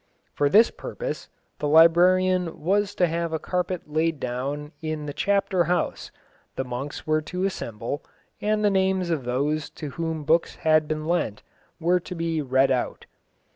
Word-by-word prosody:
For 145 - +2
this 215 +8 +6
purpose, - - -6 0.3
the 150 - -1
librarian 175 +3 +4
was 200 +4 +1
to 180 - +3
have 170 0 -2
a - - +1
carpet 180 +2 -2
laid 155 0 0
down 140 +4 -3
in 155 -1 -3
the 145 - -5
Chapter 195 -2 +1
House, 180 +2 -1 0.5
the - - -1
monks 125 +3 -6
were 155 0 +2
to 180 +4 -4
assemble, 120 - -4 0.4
and 210 0 +1
the 205 - +4
names 190 -2 +1
of 145 -6 -1
those 145 +5 -1
to 150 -2 -5
whom 165 -1 -3
books 165 +3 +2
had 155 -2 +3
been 155 0 -3
lent 165 -11 -1 0.4
were 175 +2 +3
to 180 +1 -8
be 165 -1 -1
read 135 0 +3
out. 125 -2 -1
160 Hz, 165 wpm, -25 LUFS, 150-180 Hz, 0.5 s, this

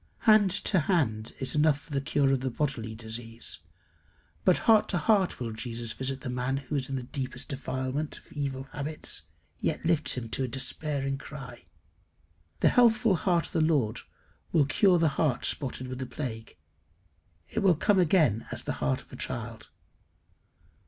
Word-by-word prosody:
Hand 215 -3 +6
to 185 +1 +1
hand 130 - 0
is 130 - -1
enough 150 -1 +3
for 160 - -17
the 140 - +1
cure 140 -1 +2
of 135 - +2
the 130 +1 -2
bodily 120 -5 -2
disease; 115 +1 -6 0.8
but 185 - +5
heart 220 -2 +5
to 180 - +1
heart 190 +2 +2
will 120 -2 -3
Jesus 115 0 -4
visit 130 0 -3
the - - -6
man 125 +2 -1
who 140 +2 -4
in 135 0 -2 0.2
deepest 130 -1 -4
defilement 135 +2 -3
of - - -17
evil 140 -2 -3
habits, 150 +2 -4 0.3
yet - - -1
lifts 165 -2 +3
to 125 - -3
him 115 - -7
a - - 0
despairing 135 +2 -1
cry. 140 -3 -9 1.0
The - - +6
healthful 230 -4 +4
heart 170 0 +1
of - - -11
the 160 - +2
Lord 145 -9 +2 0.5
will 150 -4 +4
cure 180 +6 +4
the 165 -1 +3
heart 135 -6 +1
spotted 130 -2 -1
with 130 0 -6
the 130 - -4
plague: 120 -6 -6 0.9
it - - -2
will 195 -5 +4
come 200 +5 +3
again 155 - +3
as - - -5
the - - -2
heart 65 -1 +1
of - - -20
a - - -5
child. - - -5
140 Hz, 170 wpm, -29 LUFS, 125-165 Hz, 1.0 s, Hand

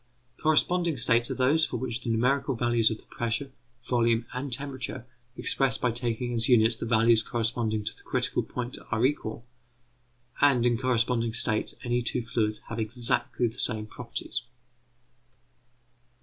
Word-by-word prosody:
Corresponding 165 +1 +2
states 120 0 +3
are - - -2
those 140 +5 +3
for - - -1
which 125 -1 -3
the - - -4
numerical 125 +4 +1
values 120 -1 +3
of 110 - -3
the - - -18
pressure, 120 +4 -3 0.3
volume, 115 -1 +1
and 130 +2 -4
temperature, 130 -2 -2 0.3
expressed 135 -1 0
by 125 - +1
taking 120 +1 -2
as 115 +1 +1
units 115 -2 +5
the 115 - -5
values 115 0 +4
corresponding 115 -2 -1
to - - -2
the - - -15
critical - - -1
point, 125 0 -2
are 115 +1 +1
equal; 120 -4 -2 1.0
and, 135 -4 +4
in 120 -1 +3
corresponding 120 -2 0
states 110 -2 +1
any 120 0 0
two 120 0 -2
fluids 110 -2 -1
have 115 - -7
exactly 115 +2 0
the 115 +2 -7
same 110 -1 +2
properties. 110 - -5
120 Hz, 150 wpm, -27 LUFS, 115-130 Hz, 1.0 s, units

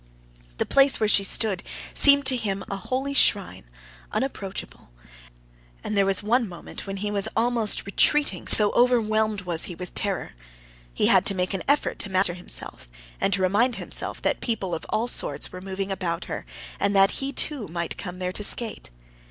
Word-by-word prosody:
The - - -1
place 275 0 +3
where 215 - +1
she 205 -1 +4
stood 195 -1 +1 0.3
seemed 280 -1 +5
to 265 - +5
him 200 -5 -3
a - - -1
holy 260 +8 -3
shrine, 200 - +2 0.5
unapproachable, 195 - -5 0.9
and 210 - -3
there 200 -1 +2
was 195 +1 +2
one 230 +1 +1
moment 175 +3 -10
when 195 0 -5
he 205 +1 -3
was 200 -1 -1
almost 230 -2 +1
retreating, 200 - +2
so 210 -1 +6
overwhelmed 220 -4 +1
was 175 -3 0
he 175 - -7
with 180 +1 -9
terror. 200 -2 -3 0.6
He - - 0
had - - +4
to 195 - +3
make 180 +1 -2
an 190 - -2
effort 285 +1 0
to 205 - -1
master 185 -1 +2
himself, 175 - -6 0.3
and - - 0
to 190 0 +1
remind 220 +7 +2
himself - - -4
that - - -1
people 200 -7 -3
of - - -5
all 225 - 0
sorts 145 -11 0
were 180 - -9
moving 195 +1 -5
about 175 -3 -3
her, - - -7 0.3
and 200 0 0
that 195 0 +5
he 270 +1 -2
too 280 -5 0
might 170 +1 -4
come 180 -2 -7
there 180 0 -3
to 210 - -4
skate. 225 +2 0
200 Hz, 185 wpm, -24 LUFS, 185-235 Hz, 0.9 s, so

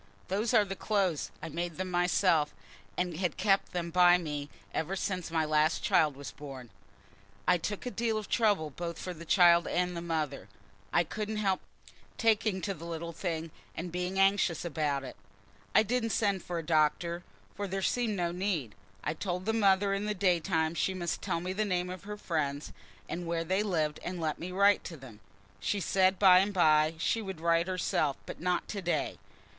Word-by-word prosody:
"Those 210 +5 0
are 220 -4 +5
the 195 0 -5
clothes. 195 -7 0
I 165 - -4
made 170 +1 -4
them 185 0 -3
myself, 175 -3 +2 0.4
and 180 -3 -1
had 180 -2 -1
kept 195 0 +2
them 170 -1 -3
by 180 0 +6
me 150 -4 -4 0.2
ever 170 +5 -1
since 185 -2 -2
my 160 -1 +1
last 155 +1 +2
child 150 -3 +3
was 140 0 -7
born. 135 -5 -10 0.8
I 180 -1 +4
took 205 +7 -4
a 250 - -3
deal 230 -2 0
of 215 -2 -4
trouble 205 -10 +2
both 170 +3 -5
for 180 - -5
the 170 0 -10
child 170 -1 +5
and 180 0 0
the 170 - -4
mother. 155 -5 -3 0.4
I 175 - +4
couldn't 215 +5 -4
help 195 -3 +1 0.6
taking 215 -4 +2
to 195 - -2
the 170 -2 -10
little 170 0 -4
thing 165 -2 -3 0.2
and 175 +1 -5
being 180 +2 -2
anxious 195 -3 +3
about 145 -4 -1
it. 130 - -8 0.6
I - - +7
didn't 230 +1 0
send 200 -3 +1
for 175 0 -4
a 165 - -3
doctor, 170 +2 +1 0.3
for 200 0 -4
there 195 0 -3
seemed 235 -2 +1
no 175 -2 0
need. 175 - -2 0.3
I 155 - -1
told 180 +2 -3
the 220 - +1
mother 200 -2 +3
in 200 +1 -2
the 210 - -1
day 180 -3 +3
time 160 -2 0
she 190 +2 0
must 175 -2 -3
tell - - -1
me 180 +2 -3
the 215 +3 0
name 180 -3 -1
of 185 +1 -8
her 210 0 -6
friends, 150 -7 -2 0.3
and 175 0 -4
where 165 0 -1
they 190 +4 +1
lived, 160 -7 0
and 180 0 -4
let 155 -2 -2
me 180 +2 -5
write 200 +2 +4
to 165 - -7
them. 125 -6 -12 0.4
She 205 - -1
said, 190 +1 +2
by 185 -2 +7
and 195 +2 +1
by 155 -2 +4
she 225 +7 0
would 190 -5 -6
write 170 +1 +2
herself, 160 -6 0
but - - -8
not 180 0 0
to 200 - -4
day. 175 -1 -1
180 Hz, 200 wpm, -30 LUFS, 160-195 Hz, 0.8 s, I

